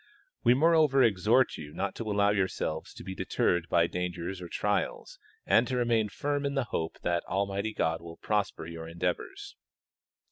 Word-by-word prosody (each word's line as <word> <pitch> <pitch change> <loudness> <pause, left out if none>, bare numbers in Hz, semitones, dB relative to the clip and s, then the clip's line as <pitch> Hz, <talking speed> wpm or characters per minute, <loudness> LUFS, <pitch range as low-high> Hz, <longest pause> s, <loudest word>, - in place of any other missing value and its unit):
We 120 - +6
moreover 155 -2 +4
exhort 115 +4 +3
you 75 -1 -9
not 100 - -2
to 110 -2 -3
allow 100 0 +3
yourselves 95 -5 -2
to - - -9
be 95 - -5
deterred 85 -2 0
by 85 0 +4
dangers 90 +1 -4
or 90 - -6
trials, 105 - -2 0.3
and 115 +2 +4
to 130 - -1
remain 115 -3 +2
firm 145 +6 -2
in 140 0 -1
the 135 - +1
hope 80 0 -2
that 85 -1 0
Almighty 100 +2 -1
God 80 0 0
will 85 -1 -10
prosper 105 -6 -1
your 80 0 -7
endeavors. 85 +2 -4
100 Hz, 170 wpm, -29 LUFS, 85-120 Hz, 0.3 s, We